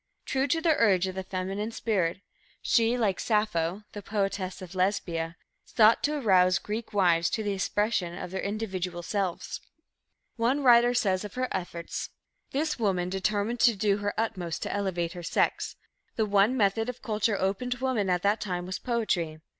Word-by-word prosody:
True 265 +1 0
to 325 +4 +1
the 320 -2 +3
urge 190 -5 +4
of 185 - -3
the 190 - -4
feminine 190 +3 -3
spirit, 195 -6 -1 0.4
she, 230 +1 +2
like 210 -6 +1
Sappho, 210 -4 0
the 205 - -7
poetess 195 -2 -2
of 185 -1 -9
Lesbia, 180 -3 -1 0.3
sought 225 0 +4
to 300 +1 0
arouse 185 -7 +4
the - - -10
Greek 215 +2 -4
wives 175 -5 +3
to 220 - -2
the 205 -1 -1
expression 195 -2 -1
of 180 - -6
their 190 - -3
individual 190 -4 -3
selves. 190 -1 -3 0.8
One 250 +5 +1
writer 240 -1 +6
says 195 -6 +1
of 210 - -8
her 255 0 0
efforts: 170 -1 -4 0.4
"This 300 0 -1
woman 185 -5 0
determined 205 +5 -1
to 235 -2 +5
do 200 0 +1
her 205 +1 -3
utmost 180 -7 -2
to - - -3
elevate 185 -4 -1
her 175 - -7
sex. 170 - 0 0.4
The 220 - +1
one 205 +5 +3
method 225 +2 +2
of 250 - -7
culture 215 -1 0
open 195 +6 -1
to 250 +1 -3
women 220 -7 0
at 180 -1 +1
that 205 +2 +2
time 180 -3 -3
was 185 0 -4
poetry. 185 -10 -1
200 Hz, 180 wpm, -28 LUFS, 185-225 Hz, 0.8 s, writer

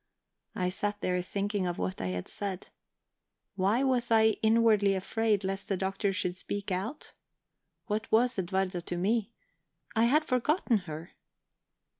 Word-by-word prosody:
I 180 -1 0
sat 205 +2 -2
there 180 0 0
thinking 200 +1 -2
of 175 - -2
what 185 - -3
I - - -1
had 90 -1 -3
said. 195 -2 -5 0.9
Why 205 +7 +2
was 255 -3 +1
I 220 -1 +6
inwardly 220 -3 +4
afraid 210 +2 0
lest 195 +1 -3
the 195 - +1
Doctor 195 +2 0
should 180 -2 -1
speak 200 +2 -4
out? 210 +11 -4 0.7
What 215 0 -3
was 235 0 +3
Edwarda 185 0 -1
to 175 +1 -4
me? 210 +4 +1 0.6
I 225 +1 +4
had 300 +6 +3
forgotten 255 - +2
her. 160 +3 -7
200 Hz, 145 wpm, -30 LUFS, 185-225 Hz, 0.9 s, I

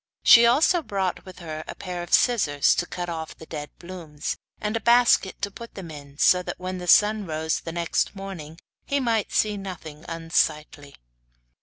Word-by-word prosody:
She 235 0 +8
also 315 +8 +4
brought 195 - -3
with 185 -1 -12
her 155 -3 -7
a - - -7
pair 180 -2 -6
of 175 - -9
scissors 150 - +3
to 175 - -2
cut 175 -1 -5
off 160 -2 -6
the 160 - -12
dead 150 -2 -7
blooms, 170 -4 -6 0.2
and 210 +1 -2
a - - 0
basket 235 -4 +3
to 200 - -1
put 235 +4 -11
them 180 -5 -8
in, 140 -2 -12
so 180 +3 +4
that - - -6
when 185 0 -5
the 180 - -7
sun 210 +2 +4
rose 160 0 -2
next 170 +4 -1
morning 180 -5 -8 0.3
he 280 - -1
might 230 -5 0
see 210 -1 +1
nothing 165 -6 -8
unsightly. 155 -3 -2
180 Hz, 180 wpm, -24 LUFS, 160-205 Hz, 0.3 s, She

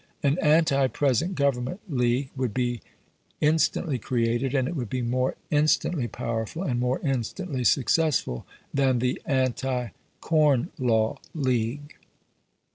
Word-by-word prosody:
An 145 +4 +2
anti 150 -4 +4
present 145 +7 0
government 140 +3 0
league 130 -2 0
would 130 -5 -2
be 120 -2 -1 0.6
instantly 155 -2 +1
created, 120 +3 0
and 130 -2 +2
it 175 - -4
would 125 -7 -3
be 130 -1 -2
more 125 +2 0 0.2
instantly 150 -2 +2
powerful 115 - -4
and 125 -9 -1
more 125 +1 0
instantly 135 - -2
successful 135 - +1 0.3
than 135 -2 +2
the 125 +1 -1
Anti 130 -3 0 0.3
Corn 150 -6 +2
Law 110 -3 +1 0.2
League. 130 0 -1
130 Hz, 120 wpm, -26 LUFS, 120-145 Hz, 0.6 s, anti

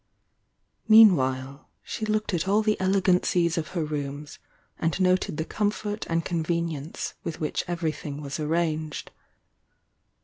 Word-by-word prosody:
Mean 220 -3 +9
while 130 0 -3
she 220 -2 -4
looked 215 -1 0
at 175 +1 -1
all 210 +3 +3
the 215 0 +2
elegancies 180 -3 +2
of 165 -2 -2
her 160 - 0
rooms, 145 0 -5 0.4
and 165 +2 0
noted 185 -4 +2
the 160 - -2
comfort 210 +1 -2
and 165 0 0
convenience 165 -3 -2
with 165 - -5
which 150 - -1
everything 155 -4 -3
was 145 +1 -5
arranged. 155 -1 -2
165 Hz, 130 wpm, -26 LUFS, 150-190 Hz, 0.4 s, Mean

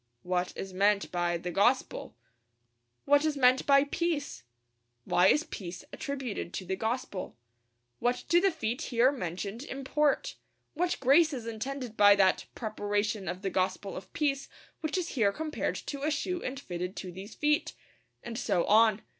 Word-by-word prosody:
What 180 0 -1
is 190 -1 -6
meant 200 +1 +2
by 175 -1 0
the 175 +1 -5
gospel? 225 - +1 0.9
What 290 +1 +5
is 310 -2 0
meant 255 -1 +4
by 275 -1 +6
peace? 305 0 -2 0.6
Why 180 +1 +4
is 300 +9 +4
peace 180 - -8
attributed 265 -10 -4
to 185 - -4
the 190 +2 -2
gospel? 220 - -3 0.6
What 245 +1 0
do 345 +1 +4
the 390 - +4
feet 260 -6 -3
here 245 +2 +4
mentioned 200 - -4
import? 285 +1 0 0.4
What 355 +3 0
grace 300 +5 +5
is 245 -4 -5
intended 240 +1 -5
by 205 0 +8
that 190 -2 +3
'preparation 210 -2 -2
of 185 +3 -4
the 195 - -1
gospel 185 +1 -1
of 185 0 -9
peace' 275 -2 -1 0.3
which 315 +3 -2
is 355 -2 -2
here 215 -7 +2
compared 310 +7 -3
to 280 -1 -6
a 300 - +1
shoe 345 +4 -2
and 265 +2 -4
fitted 180 -6 -5
to 185 - -6
these 195 +4 -9
feet? 295 0 +1 0.5
And 235 0 -5
so 175 -9 +1
on. 220 -1 +4
230 Hz, 165 wpm, -30 LUFS, 195-280 Hz, 0.9 s, by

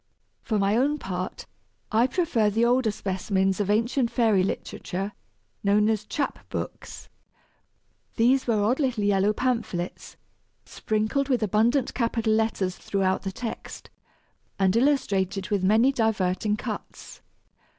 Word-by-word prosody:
For 215 - -1
my 200 +1 +2
own 280 +5 +2
part, 185 -7 -5 0.5
I 230 +3 +4
prefer 260 - +1
the 225 +3 +2
older 245 -1 +3
specimens 190 -1 -1
of 205 -1 -1
ancient 235 +4 +1
fairy 225 -5 +3
literature 195 +1 -3 0.5
known 205 +1 +3
as 215 -2 -1
chap 275 +7 -2
books. - - -6 1.1
These 255 +3 +3
were 215 -3 +2
odd 245 +7 +1
little 250 -7 0
yellow 200 0 +3
pamphlets, 220 -7 -3 0.5
sprinkled 220 +6 -1
with 250 -4 +1
abundant 230 +6 +2
capital 230 -2 0
letters 215 -4 0
throughout 190 -1 0
the 195 - -4
text, 230 +4 -7 0.7
and 190 0 +2
"Illustrated 200 -8 +1
with 200 -2 +1
many 220 +7 +4
diverting 210 -4 0
cutts!" - - -7
215 Hz, 125 wpm, -26 LUFS, 195-240 Hz, 1.1 s, I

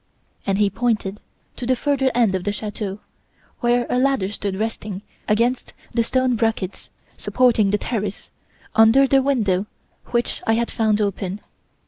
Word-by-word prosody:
"And 195 0 +2
he 205 -1 +2
pointed 210 -2 -1 0.4
to 245 - -4
the 255 - +3
further 270 0 +1
end 230 -5 +3
of 185 -1 -1
the 205 - 0
chateau, 205 -1 -5 0.6
where 240 0 +2
a 250 - +1
ladder 265 -8 +2
stood 200 -2 -3
resting 210 -2 -4 0.2
against 235 +4 +1 0.2
the 230 0 +2
stone 255 +1 +1
brackets 225 -4 -2 0.3
supporting 235 -5 +3
the 210 - +2
terrace, 210 -2 -4 0.4
under 225 +5 +6
the 270 0 +4
window 210 -8 +1 0.4
which 240 -1 -1
I 225 - +4
had 235 +1 0
found 215 -2 +1
open. 200 -1 -2
225 Hz, 150 wpm, -22 LUFS, 205-245 Hz, 0.6 s, under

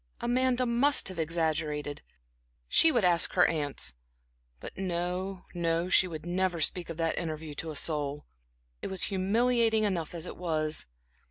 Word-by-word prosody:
Amanda 255 +1 +1
must 245 +1 +3
have 185 -3 -7
exaggerated 155 -3 -1 0.7
she 325 - +6
would 235 -9 +2
ask 175 -1 +4
her 180 - +5
aunts; 145 - -2 0.7
but - - -8
no, 180 +1 -3
no 170 0 0
she 185 - +5
would 160 -2 -7
never 180 0 0
speak 170 +2 0
of 165 - -6
that 165 -1 0
interview 155 -2 -5
to 160 +3 -4
a 155 - -6
soul. 145 -2 -1 0.6
It - - -4
was 190 -2 -2
humiliating 225 +3 +2
enough 175 -5 -2
as 170 0 -4
it - - -8
was.... 155 -3 -1
175 Hz, 155 wpm, -29 LUFS, 160-195 Hz, 0.7 s, she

